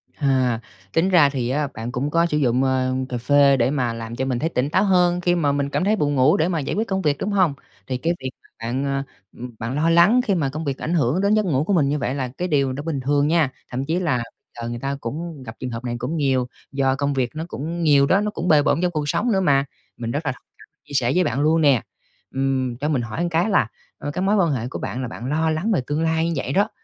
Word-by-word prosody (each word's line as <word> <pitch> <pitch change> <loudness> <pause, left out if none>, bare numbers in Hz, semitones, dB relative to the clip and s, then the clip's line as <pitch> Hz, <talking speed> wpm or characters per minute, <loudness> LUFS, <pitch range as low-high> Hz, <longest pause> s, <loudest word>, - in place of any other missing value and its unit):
À, 130 -5 +1 0.3
tính 175 +4 +2
ra 165 -6 +6
thì 130 -4 -2
á, 145 +3 0
bạn 115 +2 -5
cũng 125 +4 -2
có 165 +2 +3
sử 150 -3 0
dụng, 130 -2 +2
ờ, 130 -1 +1 0.2
cà 125 - -2
phê 140 +2 +4
để 120 +1 +2
mà 125 -5 0
làm 115 0 -6
cho 130 - -2
mình 130 -2 -1
thấy 160 - 0
tỉnh 135 -3 -1
táo 190 +6 +2
hơn 180 -3 +3
khi 175 0 +2
mà 150 -5 +1
mình 140 0 -1
cảm 145 - -1
thấy 210 +3 +3
buồn 145 -7 0
ngủ 135 +4 +4
để 160 - +2
mà 175 -3 -1
giải 140 - -3
quyết 220 +3 -1
công 190 -1 -1
việc, 150 -4 +1
đúng 210 - -2
hông? 185 -7 +3 0.3
Thì 130 - -2
cái 165 +6 0
việc 130 - -2
mà - - -24
bạn, 120 +4 -2
ờ, 135 0 -1 0.3
ừm, 120 -1 -8
bạn 115 +4 -3
lo 155 +3 +2
lắng 175 +9 +5
khi 200 - +1
mà 150 -6 0
công 155 +4 -5
việc 140 -2 -2
ảnh 165 - -3
hưởng 155 +1 +2
đến 200 +1 +3
giấc 215 -1 +2
ngủ 145 -6 +1
của 200 - 0
mình 150 -6 +3
như 150 - 0
vậy 130 0 -2
là 130 -2 -2
cái 180 - -1
điều 140 -5 +1
nó 140 - -5
bình 155 -3 -2
thường 145 +2 +1
nha. 160 -3 +3 0.2
Thậm 130 +2 -2
chí 165 +4 0
là 145 -10 0 0.4
giờ 115 - -4
người 120 0 -5
ta 140 +2 -2
cũng 150 +4 -5
gặp 110 -2 -9
trường 130 - -4
hợp 115 0 -6
này 120 -1 -3
cũng 135 +7 -3
nhiều, 135 -4 +1 0.2
do 135 -1 +1
công 140 +1 -1
việc 130 -3 0
nó 155 - -3
cũng 170 +2 -4
nhiều 145 -3 +5
đó, 190 +8 +3
nó 210 0 -1
cũng 175 -4 -4
bề 155 -3 +6
bộn 150 - +1
trong 180 -1 +1
cuộc 150 -3 -2
sống 240 +9 +1
nữa 190 -2 +2
mà. 140 -5 +3 0.3
Mình 115 -1 -4
rất 145 +5 -3
là 145 - +1
thông 125 - -13
cảm, - - -17 0.2
chia 145 - -12
sẻ 125 -3 +2
với 180 - +4
bạn 130 -4 -1
luôn 160 +2 +3
nè. 140 -7 +4 0.5
Ừm, 130 -2 0
cho 145 +4 -2
mình 140 -5 +1
hỏi 115 +6 -4
một - - +1
cái 170 +6 +2
là, 200 - +3 0.3
ờ, 145 - -5
cái 170 - -3
mối 195 +2 +2
quan 175 -6 +3
hệ 120 -4 -2
của - - -6
bạn 130 - -4
là 125 - -3
bạn 120 0 -8
lo 160 +2 +1
lắng 160 +8 0
về 185 - +2
tương 150 +2 -1
lai 160 0 +1
như - - -1
vậy 135 -1 -3
đó, 205 +5 +2
145 Hz, 295 wpm, -22 LUFS, 130-165 Hz, 0.5 s, ra